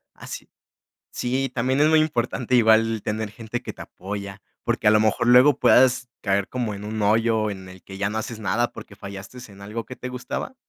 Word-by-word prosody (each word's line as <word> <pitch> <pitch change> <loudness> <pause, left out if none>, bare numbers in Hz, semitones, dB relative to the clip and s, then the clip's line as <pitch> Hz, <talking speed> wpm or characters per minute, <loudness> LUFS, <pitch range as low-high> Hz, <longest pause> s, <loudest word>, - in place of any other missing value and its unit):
Ah, - - -12
sí. - - -8 0.6
Sí, 130 +2 -1
también 130 +3 +1
es 155 - +5
muy 160 0 +5
importante 125 -4 0
igual 115 -1 +4
tener 105 0 -3
gente 115 +2 -6
que - - -7
te - - -11
apoya, 100 +1 -7 0.2
porque - - 0
a - - +7
lo 110 - +5
mejor 110 +2 +1
luego 125 +3 +6
puedas 130 0 +4
caer 100 0 0
como 120 -4 -3
en 100 +1 -8
un 110 0 -4
hoyo 110 +1 +2
en 95 -2 -7
el 95 0 -13
que 95 - -10
ya 100 0 0
no 110 - -3
haces 110 0 -5
nada 120 +3 0
porque 100 - -11
fallaste 100 +4 -9
en 100 0 -15
algo 105 +3 -5
que 130 - -10
te 125 - -6
gustaba 125 - -5
110 Hz, 215 wpm, -23 LUFS, 100-125 Hz, 0.6 s, a